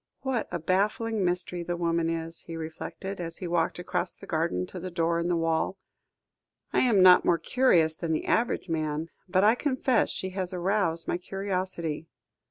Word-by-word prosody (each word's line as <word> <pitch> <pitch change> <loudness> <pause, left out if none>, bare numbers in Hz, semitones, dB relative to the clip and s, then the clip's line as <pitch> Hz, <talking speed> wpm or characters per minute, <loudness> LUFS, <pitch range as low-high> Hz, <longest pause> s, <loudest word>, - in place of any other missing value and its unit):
"What 265 -4 -1
a - - -1
baffling 205 +5 0
mystery 180 0 -1
the 175 0 -3
woman 170 -1 +1
is," 165 0 -4
he 165 - -6
reflected, 165 +4 -6
as 165 -1 -6
he 180 - -5
walked 170 -1 0
across 175 0 -2
the - - -14
garden 160 - 0
to 180 - -8
the 185 +2 -5
door 170 -1 0
in 170 - -1
the 175 - +2
wall. 165 +3 0 1.0
"I - - +4
am 215 -7 +4
not 180 -1 +8
more 170 - +3
curious 165 -5 +3
than 165 -2 -3
the 155 - -1
average 230 -4 +1
man, 155 -1 -2 0.2
but 185 +1 +3
I 215 +2 +6
confess 260 -2 +1
she 190 - -3
has 185 -1 -3
aroused 180 -2 0
my 175 - -1
curiosity. 185 -5 -3
175 Hz, 180 wpm, -28 LUFS, 165-195 Hz, 1.0 s, not